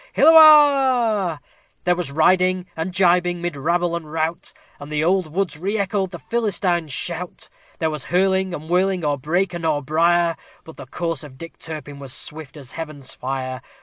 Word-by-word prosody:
Hilloah! 270 Hz, -, +5 dB, 0.4 s
There 180 Hz, 0 st, +2 dB
was 175 Hz, -5 st, -4 dB
riding 185 Hz, +4 st, +2 dB
and 160 Hz, +3 st, -3 dB
gibing 180 Hz, -1 st, +2 dB
mid 175 Hz, -2 st, -4 dB
rabble 170 Hz, +4 st, 0 dB
and 160 Hz, -3 st, -7 dB
rout, 160 Hz, +1 st, -3 dB, 0.3 s
And 145 Hz, +1 st, -10 dB
the 150 Hz, 0 st, 0 dB
old 180 Hz, -2 st, +1 dB
woods 170 Hz, -3 st, -2 dB
re 200 Hz, +5 st, -2 dB
echoed 195 Hz, -1 st, -1 dB
the 175 Hz, -, -8 dB
Philistines' 185 Hz, -7 st, -1 dB
shout! 175 Hz, +5 st, -3 dB, 0.3 s
There 160 Hz, -1 st, -1 dB
was 150 Hz, -4 st, -6 dB
hurling 190 Hz, +1 st, +1 dB
and 155 Hz, 0 st, -9 dB
whirling 180 Hz, 0 st, +1 dB
o'er 145 Hz, -1 st, 0 dB
brake 175 Hz, +7 st, -1 dB
and 170 Hz, -1 st, -6 dB
o'er 150 Hz, -2 st, 0 dB
brier, 170 Hz, +3 st, +2 dB, 0.3 s
But 160 Hz, -, -13 dB
the 130 Hz, -, -10 dB
course 165 Hz, 0 st, -4 dB
of 135 Hz, -3 st, -12 dB
Dick 165 Hz, +2 st, -11 dB
Turpin 150 Hz, -3 st, -8 dB
was 135 Hz, -2 st, -7 dB
swift 150 Hz, 0 st, -5 dB
as 135 Hz, -3 st, -9 dB
Heaven's 155 Hz, -5 st, -7 dB
fire. 130 Hz, 0 st, -5 dB
170 Hz, 175 wpm, -21 LUFS, 155-185 Hz, 0.4 s, Hilloah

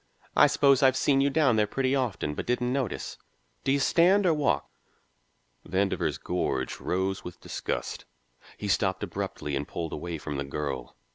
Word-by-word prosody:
I -, -, +7 dB
suppose 140 Hz, -1 st, +4 dB
I've 130 Hz, -1 st, +5 dB
seen 135 Hz, -1 st, +3 dB
you 140 Hz, -, +3 dB
down 140 Hz, -6 st, +3 dB
there 105 Hz, -1 st, +3 dB
pretty 130 Hz, +4 st, 0 dB
often, 120 Hz, -, -1 dB
but -, -, -5 dB
didn't 125 Hz, +1 st, 0 dB
notice. 130 Hz, -8 st, -3 dB, 0.4 s
Do 135 Hz, -, +1 dB
you 140 Hz, -, +4 dB
stand 180 Hz, +8 st, +4 dB
or 170 Hz, -, +5 dB
walk?" 150 Hz, -2 st, +1 dB, 1.0 s
Vandover's 95 Hz, +2 st, 0 dB
gorge 65 Hz, -7 st, -2 dB
rose 95 Hz, +2 st, -1 dB
with 90 Hz, -, -9 dB
disgust. -, -, -4 dB, 0.5 s
He 105 Hz, -, -4 dB
stopped 95 Hz, -1 st, +1 dB
abruptly 75 Hz, -1 st, -3 dB
and 70 Hz, +2 st, -3 dB
pulled 85 Hz, -2 st, -4 dB
away 85 Hz, +2 st, -4 dB
from 75 Hz, -1 st, -5 dB
the 70 Hz, -, -1 dB
girl. 70 Hz, -3 st, -4 dB
105 Hz, 165 wpm, -28 LUFS, 80-135 Hz, 1.0 s, I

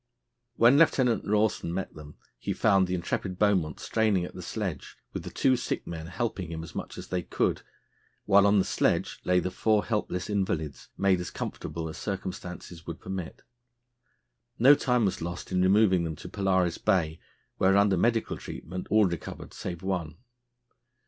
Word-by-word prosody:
When 120 Hz, +5 st, +6 dB
Lieutenant 125 Hz, -9 st, +3 dB
Rawson 105 Hz, -4 st, +1 dB
met 95 Hz, +2 st, -3 dB
them, 75 Hz, -1 st, -11 dB, 0.2 s
he -, -, -2 dB
found 95 Hz, -3 st, +3 dB
the 90 Hz, -, -1 dB
intrepid 90 Hz, +1 st, -3 dB
Beaumont 95 Hz, -7 st, +2 dB
straining 105 Hz, -5 st, +1 dB
at -, -, -9 dB
the -, -, -8 dB
sledge, -, -, -5 dB, 0.2 s
with -, -, -3 dB
the -, -, -7 dB
two 130 Hz, -, +2 dB
sick 120 Hz, -, -3 dB
men 80 Hz, -1 st, -6 dB
helping 95 Hz, -3 st, -3 dB
him 80 Hz, 0 st, -5 dB
as 80 Hz, -, -10 dB
much -, -, -6 dB
as -, -, -8 dB
they 90 Hz, -1 st, -1 dB
could, -, -, -1 dB, 0.6 s
while 100 Hz, 0 st, +6 dB
on 100 Hz, +1 st, +4 dB
the 95 Hz, -, +3 dB
sledge -, -, 0 dB
lay 90 Hz, 0 st, +4 dB
the 90 Hz, -, -2 dB
four 105 Hz, +2 st, +2 dB
helpless 105 Hz, -5 st, -2 dB
invalids, 95 Hz, -8 st, -2 dB
made 95 Hz, -2 st, +3 dB
as 90 Hz, -, -4 dB
comfortable 80 Hz, +1 st, -5 dB
as 80 Hz, -, -7 dB
circumstances 90 Hz, -3 st, -6 dB
would 85 Hz, -1 st, -6 dB
permit. 95 Hz, -3 st, -6 dB, 1.1 s
No 135 Hz, +5 st, +8 dB
time 125 Hz, -5 st, +2 dB
was 95 Hz, -, -1 dB
lost 85 Hz, +3 st, -5 dB
in 90 Hz, 0 st, +2 dB
removing 95 Hz, -1 st, +4 dB
them 80 Hz, -2 st, -3 dB
to -, -, -10 dB
Polaris 95 Hz, -3 st, +1 dB
Bay, 80 Hz, -3 st, +1 dB, 0.4 s
where, 95 Hz, +1 st, +4 dB
under 100 Hz, -1 st, +4 dB
medical 115 Hz, +5 st, +1 dB
treatment, 90 Hz, +3 st, -7 dB
all 110 Hz, -1 st, +5 dB
recovered 85 Hz, -3 st, -5 dB
save 85 Hz, -1 st, -6 dB
one. 85 Hz, -5 st, -2 dB
95 Hz, 170 wpm, -28 LUFS, 85-105 Hz, 1.1 s, No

